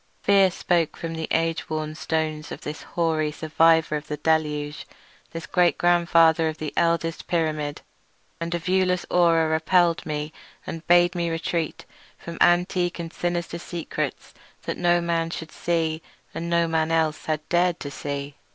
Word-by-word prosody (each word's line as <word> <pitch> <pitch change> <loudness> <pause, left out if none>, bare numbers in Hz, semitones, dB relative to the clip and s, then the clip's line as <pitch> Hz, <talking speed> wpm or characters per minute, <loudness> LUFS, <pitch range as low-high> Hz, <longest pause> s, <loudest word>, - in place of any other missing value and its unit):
Fear 195 -1 +5
spoke 170 -2 0
from 165 0 -5
the 160 0 -4
age 165 0 0
worn 155 -1 -3
stones 155 -1 -2
of - - -7
this 150 +1 -6
hoary 160 -3 -1
survivor 160 0 +3
of 150 0 -5
the 150 - -4
deluge, 150 -1 -1 0.4
this 165 +1 -7
great 180 -1 +2
grandmother 170 -2 +4
of 155 0 -3
the 155 -1 -5
eldest 165 -1 0
pyramid; 155 -3 -1 0.6
and 170 +1 -2
a - - +1
viewless 180 +1 +1
aura 165 -2 +4
repelled 165 +2 +2
me 150 0 -4 0.3
and 165 0 -7
bade 175 0 +5
me 170 -2 -1
retreat 165 0 -3 0.3
from 170 0 -9
antique 175 0 +3
and 170 -1 -6
sinister 175 -1 -2
secrets 170 -1 -5 0.3
that - - -3
no 175 0 +3
man 165 -1 0
should 160 -1 -6
see, 165 -2 -1 0.3
and 170 +1 -4
no 170 0 +2
man 160 0 0
else 160 -1 0
had 155 -1 -1
ever - - -38
dared 175 0 +2
to 140 - -5
see. 140 0 -5
165 Hz, 160 wpm, -24 LUFS, 155-175 Hz, 0.6 s, Fear